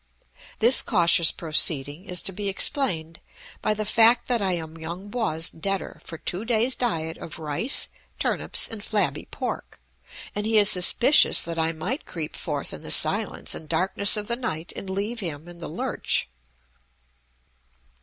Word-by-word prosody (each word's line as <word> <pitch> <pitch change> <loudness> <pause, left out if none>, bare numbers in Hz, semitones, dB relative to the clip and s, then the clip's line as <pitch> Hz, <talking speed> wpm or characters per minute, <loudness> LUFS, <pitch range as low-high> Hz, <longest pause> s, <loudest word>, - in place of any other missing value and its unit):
This 240 +3 +6
cautious 170 -4 +3
proceeding 155 0 +1
is 180 -2 -1
to - - -3
be 200 +1 -2
explained 170 - 0 0.4
by 215 - +1
the 215 0 -3
fact 230 +3 +5
that 240 -3 +1
I 190 -2 +1
am 160 -1 -6
Yung 175 +5 -7
Po's 165 -9 0
debtor 195 +3 -4
for 165 - -8
two 180 +5 -3
days' 235 +2 +1
diet 160 -9 -2
of 160 - -8
rice, 160 - +1 0.3
turnips, - - -1
and 220 -3 -6
flabby 210 -1 -1
pork, - - -6 0.5
and 210 +1 -2
he 220 0 +2
is 210 0 +6
suspicious 235 +10 +5
that 165 0 -4
I 160 0 +1
might 185 - -4
creep 155 -3 -5
forth - - -4
in - - -8
the - - -8
silence - - +2
and 155 - -9
darkness 190 +5 +1
of 210 - -3
the 235 +2 -1
night 170 -9 -4
and 195 - -7
leave 205 +5 -3
him 165 -5 -5
in 175 0 -12
the 165 - -7
lurch. - - -2
190 Hz, 165 wpm, -24 LUFS, 165-220 Hz, 0.5 s, This